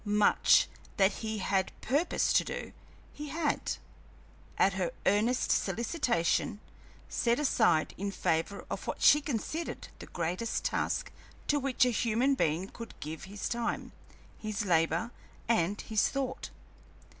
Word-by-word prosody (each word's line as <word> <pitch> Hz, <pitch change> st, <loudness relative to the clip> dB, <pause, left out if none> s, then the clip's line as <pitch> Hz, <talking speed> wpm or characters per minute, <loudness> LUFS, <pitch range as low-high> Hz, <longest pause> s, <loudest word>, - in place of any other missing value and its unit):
Much 210 Hz, -1 st, +4 dB, 0.3 s
that 195 Hz, 0 st, +5 dB
he 220 Hz, -1 st, -2 dB
had 190 Hz, -1 st, 0 dB
purposed 290 Hz, +7 st, +1 dB
to -, -, +5 dB
do, -, -, -5 dB, 0.4 s
he 300 Hz, 0 st, -7 dB
had, 305 Hz, 0 st, -1 dB, 0.8 s
at 195 Hz, -, +4 dB
her 185 Hz, -2 st, -1 dB, 0.2 s
earnest 220 Hz, +6 st, +2 dB
solicitation, 235 Hz, -, +1 dB, 0.5 s
set 235 Hz, 0 st, +1 dB
aside 220 Hz, -, +3 dB
in 200 Hz, +1 st, -1 dB
favor 195 Hz, +1 st, -1 dB
of -, -, -4 dB
what -, -, -3 dB
she 295 Hz, -, +7 dB
considered 295 Hz, +4 st, -4 dB
the -, -, -9 dB
greatest 180 Hz, +7 st, -2 dB
task -, -, -1 dB, 0.3 s
to 290 Hz, -, +2 dB
which 260 Hz, -2 st, +2 dB
a 250 Hz, -, +2 dB
human 235 Hz, +4 st, +2 dB
being 170 Hz, -, 0 dB
could 230 Hz, +2 st, -10 dB
give 155 Hz, +3 st, -6 dB
his 200 Hz, +1 st, -5 dB
time, 235 Hz, -1 st, -2 dB, 0.5 s
his 215 Hz, 0 st, -3 dB
labor, 175 Hz, +6 st, +2 dB, 0.4 s
and 205 Hz, -3 st, +1 dB
his 215 Hz, -2 st, +1 dB
thought. 270 Hz, -2 st, -3 dB
220 Hz, 135 wpm, -31 LUFS, 190-255 Hz, 0.8 s, she